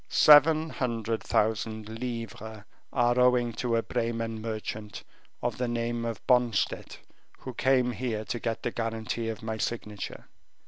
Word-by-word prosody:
"Seven 155 +1 +7
hundred 115 -5 -2
thousand 110 0 0
livres 110 -2 -6 0.3
are 120 -1 +2
owing 125 -1 +4
to 120 +1 -1
a 115 - +1
Bremen 115 -1 -2
merchant 110 -1 -5 0.4
of - - -1
the 125 - 0
name 120 0 -2
of 115 -1 -5
Bonstett, 125 -5 +1 0.4
who 130 - -8
came 130 -1 +2
here 110 -2 -3
to 120 - -3
get 115 -1 -3
the 120 - -1
guarantee 115 0 -3
of 110 -1 -6
my 110 0 -3
signature." 105 -3 -4
115 Hz, 140 wpm, -28 LUFS, 110-125 Hz, 0.4 s, Seven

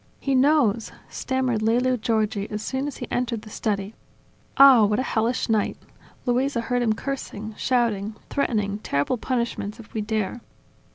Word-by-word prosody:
"He 275 - -1
knows!" 255 -5 +3 0.2
stammered 260 -4 -1
Lelio 245 +3 +2
Giorgi 215 -3 -1
as 210 0 -4
soon 265 +1 -2
as 290 - -6
he - - -6
entered 235 -3 -1
the 215 - -11
study. 205 -1 -2 0.6
"Ah, 270 -4 +9
what 210 0 +2
a 255 - +1
hellish 230 0 0
night! 220 -3 +1 0.5
Luisa 255 +1 +1
heard 245 +1 -1
him 225 -2 +2
cursing, 220 -4 -5
shouting, 220 -5 0
threatening 210 -7 -1
terrible 145 - -1
punishments 235 -3 -2
if 220 - -13
we 220 - -1
dare." 215 +2 -2
230 Hz, 155 wpm, -24 LUFS, 215-255 Hz, 0.6 s, Ah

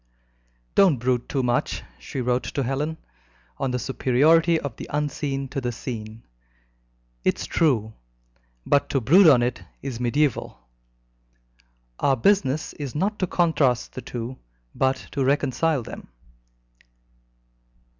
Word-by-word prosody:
"Don't 185 -8 +5
brood 125 0 -1
too 135 -2 0
much," 120 0 0 0.2
she 125 - -5
wrote 125 +1 +1
to 140 - +1
Helen, 145 +5 -2 0.6
"on 135 - 0
the 125 - -1
superiority 155 +6 +3
of 140 -7 -5
the - - -8
unseen 145 -2 -2
to 135 0 -3
the 120 -1 -2
seen. 115 -2 -7 1.0
It's - - 0
true, 115 -9 +1 0.7
but 140 - +2
to 135 - +1
brood 170 - +6
on 125 -5 +5
it 120 +1 -2 0.2
is 130 -4 -4
mediaeval. 130 - 0 1.4
Our 135 -1 +2
business 155 - +1
is 145 -3 -6
not 200 +7 -1
to 185 - 0
contrast 145 -9 +1
the 130 - -6
two, 120 +1 -6 0.3
but 130 0 +2 0.2
to 140 - -1
reconcile 140 +1 +1
them." - - -9
135 Hz, 125 wpm, -24 LUFS, 125-150 Hz, 1.4 s, brood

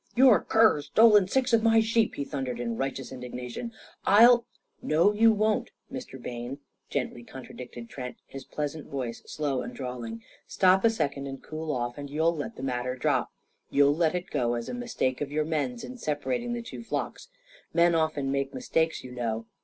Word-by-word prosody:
"Your 250 -3 +7
cur's 215 -10 +3
stolen 210 +3 +6
six 255 +4 +1
of 230 - +5
my 225 0 +5
sheep!" 225 0 +2
he 140 - -2
thundered 130 -5 -4
in 115 -1 -2
righteous 135 +1 -3
indignation. 125 - -6 0.3
"I'll 235 +3 +6 0.2
" - - -44
"No, 170 +7 +5
you 225 +2 +6
won't, 220 +3 +1 0.2
Mr. 250 - -7
Bayne," 120 +2 -6 0.3
gently 120 - -3
contradicted 120 -1 -9
Trent, 125 -1 -7
his 135 - -9
pleasant 150 0 -5
voice 125 -4 -4
slow 145 -4 -1
and - - -7
drawling. 120 -4 -6 0.2
"Stop 190 0 +4
a 230 - +6
second 140 -10 -2
and 135 -1 -7
cool 155 0 -4
off, 120 -1 -3
and 140 0 -6
you'll 160 +3 +1
let 145 -3 -5
the 130 - -8
matter 125 -1 -2
drop. 130 - 0 0.4
You'll 145 +1 +4
let 165 +1 +2
it 180 +1 -4
go 120 -1 +1
as 120 0 -4
a - - -4
mistake 235 - -2
of 145 -1 -3
your 155 +1 0
men's 170 +10 -2
in 255 +2 -8
separating 240 - -2
the 235 0 -4
two 230 - -8
flocks. - - -4 0.4
Men 170 0 +4
often 155 -4 0
make 140 0 -1
mistakes, 165 -10 0
you 130 - -9
know. 115 -2 -3
150 Hz, 185 wpm, -28 LUFS, -, 0.4 s, Your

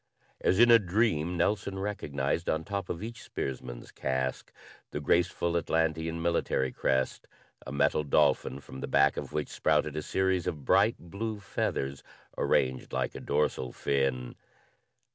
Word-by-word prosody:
As 95 - +2
in 120 0 +8
a 115 - +9
dream, 90 -4 +1
Nelson 95 +2 0
recognized 85 -6 -2
on 80 0 0
top 100 0 -4
of 85 - -4
each 115 +1 -7
spearsman's 65 -2 -5
casque 65 -1 -2 0.4
the - - -4
graceful 85 +3 +1
Atlantean 80 0 0
military 85 -6 0
crest 65 -1 0 0.4
a - - -5
metal 70 +2 +2
dolphin 70 -1 +2
from 65 - -10
the - - -3
back 70 0 +4
of - - -5
which 75 -2 -2
sprouted 75 -1 +1
a 75 - -1
series 95 +1 0
of 75 -4 -4
bright 105 +4 +4
blue 105 +5 -5
feathers, 70 -8 -2 0.3
arranged 65 0 +1
like - - -1
a - - -7
dorsal 70 -4 0
fin. 65 -3 -1
80 Hz, 145 wpm, -29 LUFS, 70-95 Hz, 0.4 s, a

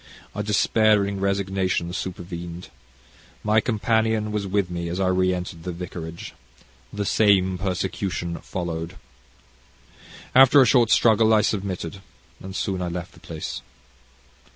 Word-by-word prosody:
A 105 - -3
despairing 105 -1 +2
resignation 95 -3 -1
supervened. 85 -1 -6 0.7
My 110 +1 +3
companion 110 -1 0
was 105 -2 -2
with 95 -2 0
me 85 -1 -3
as 90 +2 -3
I 95 -1 +2
re 95 0 +2
entered 90 -2 -5
the 90 +2 -4
vicarage. 85 -1 -7 0.6
The 105 0 -3
same 95 -3 +3
persecution 90 -2 -2
followed. 85 -1 -5 1.4
After 135 +2 +7
a 130 - +7
short 120 -3 +4
struggle 110 -1 +4
I 105 - +4
submitted, 95 -4 -3 0.4
and 95 0 -8
soon 95 -3 -2
I 90 - -2
left 85 0 -5
the - - -17
place. 80 -2 -6
95 Hz, 130 wpm, -24 LUFS, 90-105 Hz, 1.4 s, After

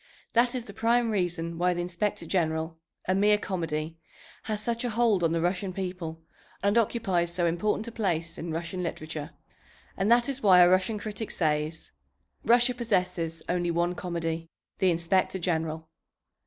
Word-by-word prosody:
That 240 +2 +3
is 245 -2 -3
the 200 - -10
prime 230 +2 +2
reason 170 -4 -1
why 180 0 +2
the 175 - -1
Inspector 180 +4 -2
General, 160 -2 0 0.3
a 185 - +3
mere 210 +2 +4
comedy, 165 -5 -3 0.5
has 215 -2 -2
such 235 +2 -1
a 245 - 0
hold 220 -5 +2
on 165 - +3
the 165 0 +1
Russian 185 +2 -1
people 180 -4 -5 0.4
and 200 +1 +3
occupies 195 -7 +1
so 175 0 0
important 210 +6 0
a - - -5
place 170 -7 -1
in 165 0 -5
Russian 170 +3 -3
literature. 155 -3 -4 0.7
And 195 +2 0
that 240 +2 +5
is 275 -1 -3
why 185 -5 +7
a 175 - +7
Russian 190 +4 +2
critic 210 +1 -5
says, 155 -1 -1 0.5
"Russia 240 +2 +4
possesses 180 -8 -1
only 175 -1 0
one 170 +1 +1
comedy, 165 -2 -3 0.3
the 190 - +4
Inspector 170 +3 +1
General." 160 -3 -2
180 Hz, 165 wpm, -28 LUFS, 165-210 Hz, 0.7 s, why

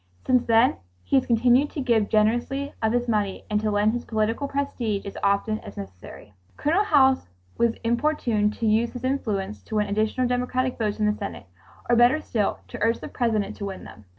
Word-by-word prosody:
Since 250 -1 +2
then 230 +2 +4 0.3
he - - 0
has 260 - +1
continued 245 +4 +3
to - - -6
give 235 -6 +1
generously 240 +6 +1
of 220 -1 +2
his 245 +1 0
money 210 -4 -1
and 210 0 +1
to 215 - 0
lend 210 +1 +2
his 240 0 -3
political 225 +5 -1
prestige 245 -7 -2
as 200 - -7
often 200 +2 +1
as 100 - -11
necessary. 95 +1 -10 0.2
Colonel 335 +8 +2
House 270 -8 +3 0.3
was 235 -1 +1
importuned 235 -4 +1
to 230 - -3
use 225 +2 +2
his 245 -1 -7
influence 215 -7 -2
to 220 - -7
win 210 -1 +2
additional 215 +5 0
Democratic 250 +1 -1
votes 215 -1 -1
in 215 - +2
the 210 - +2
Senate, 200 - -7 0.4
or 240 - +4
better 240 +6 +5
still 215 -9 -2
to - - -8
urge 230 +2 +2
the - - -8
President 220 -4 -1
to 200 - -5
win 195 -1 -6
them. 105 - -13
230 Hz, 200 wpm, -24 LUFS, 210-250 Hz, 0.4 s, better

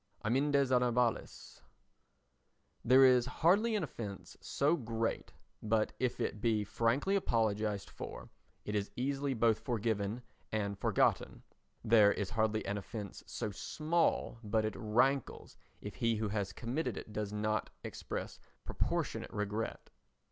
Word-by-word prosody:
Amendes 140 +3 +2
Honorables 125 -1 0 1.2
There 130 +2 +7
is 125 -1 +5 0.2
hardly 210 +7 +4
an 205 - 0
offence 105 - -7
so 145 +4 +1
great 115 -5 -2 0.3
but 110 0 +1
if 125 -2 -1
it 105 - -2
be 110 -2 +2
frankly 120 - +1
apologised 110 - 0
for - - -8 0.3
it 105 - -3
is 105 -1 -1
easily 135 +1 -1
both 115 -1 +3
forgiven 110 -1 -1 0.3
and 100 -2 -1
forgotten. - - +1 0.4
There 110 -3 +6
is 100 -2 -2
hardly 110 0 0
an 100 +1 -2
offence 100 -1 -7
so 105 - -3
small 155 - 0
but 110 +1 +1
it 110 - -2
rankles 120 +5 0 0.3
if 105 - -6
he 115 -2 +2
who 110 -1 -1
has 100 -2 -2
committed 125 +7 -3
it 105 - -8
does 105 -1 -3
not 110 0 -1
express - - -5 0.3
proportionate - - -2
regret. 105 +2 -3
115 Hz, 130 wpm, -34 LUFS, 105-130 Hz, 1.2 s, There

